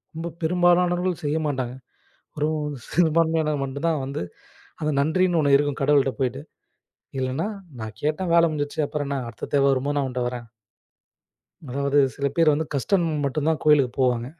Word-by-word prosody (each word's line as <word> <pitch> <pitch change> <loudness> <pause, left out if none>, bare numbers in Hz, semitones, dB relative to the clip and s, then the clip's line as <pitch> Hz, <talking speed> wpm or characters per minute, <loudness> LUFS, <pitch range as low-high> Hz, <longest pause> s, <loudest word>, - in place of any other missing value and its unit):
ரொம்ப 165 +1 -4
பெரும்பாலானவர்கள் 175 +1 +2
செய்யமாட்டாங்க. 145 -5 -1 0.6
ஒரு 150 - +1 0.4
சிறுபான்மையினர் 160 -2 +2
மட்டும்தான் 140 +4 -1
வந்து, 140 +2 -4 0.6
அந்த 155 - 0
நன்றின்னு 170 +4 +2
ஒண்ணு 140 -2 +3
இருக்கும் 145 0 +1
கடவுள்ட்ட 135 -1 +3
போயிட்டு. 125 - -1 0.8
இல்லன்னா, 130 +6 -1 0.3
நான் 110 0 -7
கேட்டேன் 155 +4 -1
வேலை 170 0 +6
முடிஞ்சுருச்சு. 150 -1 -2
அப்புறம் 145 -1 -3
என்ன 140 -1 -1
அடுத்த 110 -4 -8
தேவை 140 -1 +4
வரும்போது 140 +2 0
நான் 135 - 0
உன்கிட்ட 125 -1 -2
வரேன். 120 -1 -6 1.2
அதாவது 140 +2 +1 0.2
சில 140 -1 -1
பேர் 165 -2 +5
வந்து 160 +1 -2
கஷ்டம் 175 +6 +1 0.2
மட்டும்தான் 155 +3 0
கோயிலுக்குப் 140 -5 +3
போவாங்க. 125 -2 +1
145 Hz, 140 wpm, -24 LUFS, 135-160 Hz, 1.2 s, வேலை